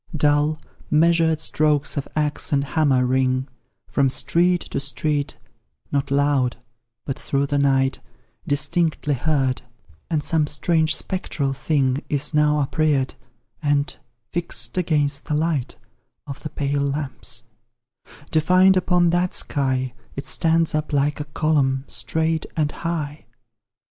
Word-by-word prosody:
Dull, 150 +1 +2 0.3
measured 160 0 +3
strokes 150 -2 +1
of 140 - -3
axe 150 -1 0
and 140 -1 +2
hammer 140 -3 +2
ring 130 +1 +1 0.4
From 140 -2 +2
street 175 +6 +2
to - - -1
street, 140 +1 -1 0.5
not 140 -1 0
loud, 140 -3 +1 0.5
but 140 +1 -4
through 140 0 0
the 145 0 0
night 135 -1 +2 0.5
Distinctly 155 +1 +1
heard 135 -2 0 0.5
and 155 -3 0
some 155 -2 +1
strange 160 +1 +1
spectral 150 -7 -2
thing 135 -1 0
Is 145 +1 +1
now 150 0 +3
uprear'd 145 -1 +1 0.5
and, 145 +1 0 0.4
fix'd 175 0 0
against 150 -5 0
the 150 - -1
light 155 -4 -1 0.5
Of 140 -1 -7
the 155 - -5
pale 140 -1 -1
lamps, 140 -4 -3 0.9
defined 185 +4 +5
upon 180 -2 +3
that 175 +1 +1
sky, 130 -3 0 0.2
It 140 - -4
stands 165 +2 +2
up 155 0 -2
like 145 +1 +1
a 150 - -4
column, 145 -3 0
straight 160 0 -1
and 150 -2 +1
high. 155 -6 -4
150 Hz, 125 wpm, -22 LUFS, 140-160 Hz, 0.9 s, defined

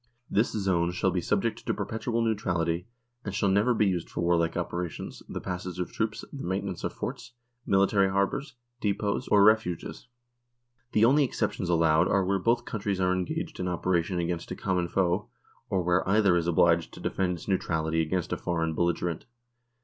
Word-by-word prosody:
This 110 +4 +2
zone 95 -5 +1
shall 95 +1 +1
be 90 0 -1
subject 110 +5 -1
to - - -1
perpetual 115 +1 -2
neutrality, 85 -5 0 0.4
and 100 -2 -4
shall 100 - +2
never 100 +6 +3
be 105 - +3
used 90 -4 -1
for - - -4
warlike 85 -1 +2
operations, 85 -1 -4
the - - -4
passage 90 -1 -5
of 90 - -3
troops, 110 -1 -2
the 140 - -6
maintenance 95 0 -3
of - - -1
forts, - - -6 0.3
military 100 0 +3
harbours, 100 +9 -1 0.2
depots, 100 -1 -1
or 100 -1 +5
refuges. 105 -4 +1 0.9
The 110 - +5
only 140 +5 +5
exceptions 105 -7 -2
allowed 80 0 +4
are 100 -1 +2
where 100 +1 +1
both 120 +4 +1
countries 100 -3 -2
are 90 0 +2
engaged 90 -1 -3
in 90 - -1
operation 90 0 0
against 85 0 -2
a - - -4
common 90 -3 -1
foe, 90 +2 0 0.4
or 95 -2 +1
where 90 +2 +1
either 100 -3 +4
is 85 -1 0
obliged 85 0 +3
to - - -10
defend 95 -2 -1
its 85 - -8
neutrality 80 -4 0
against 85 +2 -1
a - - -1
foreign 80 -2 -1
belligerent. 85 0 -1
95 Hz, 175 wpm, -28 LUFS, 85-100 Hz, 0.9 s, or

